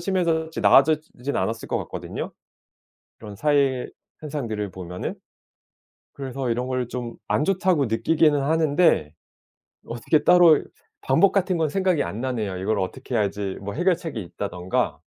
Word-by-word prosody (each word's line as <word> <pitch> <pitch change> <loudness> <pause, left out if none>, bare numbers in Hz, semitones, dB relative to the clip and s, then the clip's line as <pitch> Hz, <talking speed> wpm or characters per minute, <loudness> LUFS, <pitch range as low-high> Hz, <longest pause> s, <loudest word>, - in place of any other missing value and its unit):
심해졌지 170 -3 -1
나아졌지 155 +3 +4
지는 140 - 0
않았을 115 0 -3
것 - - 0
같거든요, - - -6 0.9
그런 105 -2 -10
사회 140 0 +1 0.3
현상들을 115 -10 -4
보면은. 90 0 -6 1.0
그래서 135 -2 -4
이런 120 +2 -1
걸 130 -2 -1
좀 120 -2 -5
'안 150 - +1
좋다.'고 185 -7 +2
느끼기는 145 +7 +2
하는데 155 - +2 0.8
어떻게 120 +6 0
따로 175 -4 +6 0.4
방법 160 +9 +4
같은 185 -2 +1
건 160 -2 +1
생각이 185 -4 +1
안 105 - -5
나네요, 110 -8 -2
이걸 105 +3 -1
"어떻게 125 +7 -4
해야지 100 -2 -1
뭐 100 +1 -5
해결책이 165 - -1
있다."든가. 90 -1 -3
135 Hz, 320 characters per minute, -24 LUFS, 110-160 Hz, 1.0 s, 따로